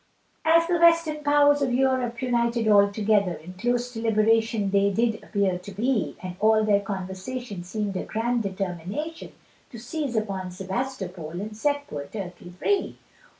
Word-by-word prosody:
As 330 Hz, +1 st, +5 dB
the 345 Hz, 0 st, +1 dB
western 335 Hz, -3 st, +4 dB
powers 290 Hz, 0 st, +4 dB
of 265 Hz, -2 st, +1 dB
Europe 255 Hz, -2 st, +1 dB
united 235 Hz, -2 st, +1 dB
all 200 Hz, -1 st, +5 dB
together, 205 Hz, -3 st, +2 dB
In 170 Hz, +4 st, -11 dB
close 245 Hz, +5 st, -1 dB
deliberation 225 Hz, -2 st, +2 dB
they 200 Hz, 0 st, +3 dB
did 225 Hz, +2 st, 0 dB
appear 195 Hz, -3 st, 0 dB
to 180 Hz, +3 st, -10 dB
be, 225 Hz, +2 st, -1 dB
And 180 Hz, -1 st, -5 dB
all 215 Hz, +1 st, +4 dB
their 205 Hz, -2 st, +4 dB
conversation 195 Hz, +2 st, -5 dB
seemed 200 Hz, +2 st, -3 dB
a -, -, -1 dB
grand 235 Hz, +2 st, -1 dB
determination, 195 Hz, -, -4 dB, 0.4 s
To 235 Hz, -, -10 dB
seize 250 Hz, +2 st, -4 dB
upon 195 Hz, -4 st, -2 dB
Sebastopol 185 Hz, -4 st, -4 dB
and 210 Hz, +2 st, -6 dB
set 285 Hz, +5 st, 0 dB
poor 145 Hz, -, -6 dB
Turkey 180 Hz, -3 st, -7 dB
free! 400 Hz, -, 0 dB
220 Hz, 150 wpm, -25 LUFS, 195-255 Hz, 0.4 s, As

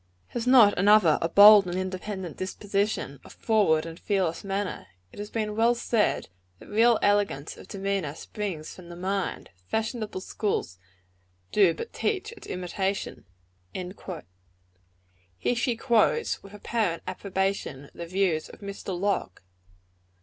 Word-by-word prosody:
Has 240 Hz, 0 st, -4 dB
not 240 Hz, -6 st, +7 dB
another 200 Hz, -5 st, +5 dB
a 165 Hz, -, 0 dB
bold 205 Hz, +1 st, +9 dB
and 175 Hz, +1 st, -2 dB
independent 185 Hz, -1 st, -4 dB
disposition, 195 Hz, -6 st, -2 dB
a -, -, -14 dB
forward 200 Hz, -9 st, +2 dB
and 165 Hz, 0 st, -8 dB
fearless 190 Hz, -5 st, -1 dB
manner? 195 Hz, 0 st, -3 dB, 0.2 s
It -, -, -13 dB
has 205 Hz, 0 st, -5 dB
been 215 Hz, -2 st, -2 dB
well 230 Hz, +2 st, +3 dB
said, 230 Hz, -2 st, 0 dB, 0.3 s
that -, -, -15 dB
real 225 Hz, +2 st, +4 dB
elegance 205 Hz, -8 st, +1 dB
of -, -, -13 dB
demeanor 195 Hz, -6 st, -2 dB
springs 180 Hz, -5 st, -5 dB
from 175 Hz, -2 st, -13 dB
the 175 Hz, -, -8 dB
mind; 190 Hz, -, -3 dB, 0.2 s
fashionable 220 Hz, -3 st, -2 dB
schools 185 Hz, -, -2 dB, 0.7 s
do 190 Hz, -6 st, +4 dB
but 465 Hz, -, -7 dB
teach 405 Hz, -1 st, -1 dB
its 455 Hz, -, -12 dB
imitation." 190 Hz, +2 st, -3 dB, 2.1 s
Here 245 Hz, -, 0 dB
she 240 Hz, 0 st, 0 dB
quotes, 235 Hz, -, +2 dB
with 200 Hz, +1 st, -13 dB
apparent 205 Hz, -5 st, -1 dB
approbation, 190 Hz, -7 st, -3 dB
the 170 Hz, -, -7 dB
views 180 Hz, -3 st, 0 dB
of -, -, -14 dB
Mr. 200 Hz, -2 st, -5 dB
Locke. 195 Hz, -, -1 dB
200 Hz, 135 wpm, -27 LUFS, 180-215 Hz, 2.1 s, bold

